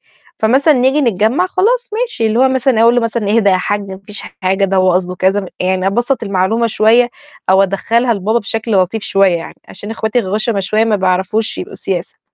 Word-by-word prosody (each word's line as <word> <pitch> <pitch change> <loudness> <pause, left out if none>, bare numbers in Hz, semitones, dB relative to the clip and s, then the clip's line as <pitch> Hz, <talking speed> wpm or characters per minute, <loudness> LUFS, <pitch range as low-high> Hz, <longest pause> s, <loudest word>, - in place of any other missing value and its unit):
يعني."فمثلًا 270 +7 +1
نيجي 265 +4 +2
نتجمع 235 - +1
خلاص 470 +7 0
ماشي 450 - -2
اللي 220 +2 0
هو 265 +1 +4
مثلًا 260 -3 +1
أقول 235 +1 +5
له 245 - +2
مثلًا: 230 -2 -2
"اهدى 205 -3 +3
يا 185 - +3
حج 205 +2 -3
ما 190 - -7
فيش 210 0 -6 0.2
حاجة، 190 +2 +1
ده 195 0 0
هو 185 -1 +3
قصده 180 0 -1
كذا" 190 +1 0
يعني 185 +1 0
أبسّط 240 +6 0
المعلومة 200 +3 0
شوية، 230 +3 +3 0.4
أو 190 +1 +5
أدخلها 230 +5 0
لبابا 215 +4 0
بشكل 225 +1 -4
لطيف 195 +2 +1
شوية 195 -3 +2
يعني، 165 - -8
عشان 205 - -9
أخواتي 220 +2 -1
غُشَما 210 +1 -1
شوية، 215 +4 +1
ما 215 -2 +1
بيعرفوش 190 +3 -1
يبقوا - - -7
سياسة. 185 -3 -5
215 Hz, 195 wpm, -15 LUFS, 190-240 Hz, 0.4 s, أقول